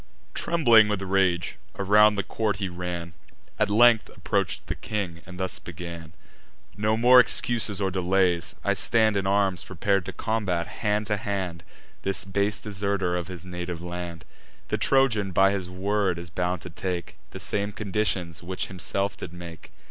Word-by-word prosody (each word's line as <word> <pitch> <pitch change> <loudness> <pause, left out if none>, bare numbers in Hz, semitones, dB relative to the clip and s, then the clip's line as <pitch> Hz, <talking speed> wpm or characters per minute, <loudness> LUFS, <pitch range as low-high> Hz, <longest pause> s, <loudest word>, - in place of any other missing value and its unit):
Trembling 120 -11 +5
with 105 -2 -1
rage, 95 -3 +1 0.2
around 105 +2 +5
the 100 - -1
court 110 -1 -1
he 100 -2 -2
ran, 90 -1 -5 0.5
At 105 -1 +2
length 115 +1 +5
approach'd - - -2
the - - -3
king, 95 -6 -4
and 90 +1 -10
thus 95 -1 -2
began: 85 -1 -8 0.6
"No 110 +1 +1
more 125 +2 +8
excuses 110 -3 +2
or 95 -1 0
delays: 90 -2 +1
I - - +2
stand 110 -3 +2
In 95 -1 0
arms 100 -2 +1
prepar'd 95 0 0
to - - -4
combat, 100 -6 -1
hand 105 +2 -1
to 105 0 0
hand, 95 -5 -3 0.4
This 95 0 -1
base 100 +1 0
deserter 100 -3 -1
of 90 -2 -3
his 90 -2 -8
native 90 -1 -5
land. 85 -1 -6 0.4
The - - -1
Trojan, 115 -8 +2
by 95 +2 +5
his 95 -3 -3
word, 95 0 0
is 85 0 -8
bound 90 0 -1
to 90 - -8
take 90 0 -4
The - - -8
same 100 0 0
conditions 95 -5 -2
which 90 +1 -4
himself 100 +2 -2
did 80 - -7
make. 85 -2 -10
95 Hz, 165 wpm, -26 LUFS, 90-105 Hz, 0.6 s, more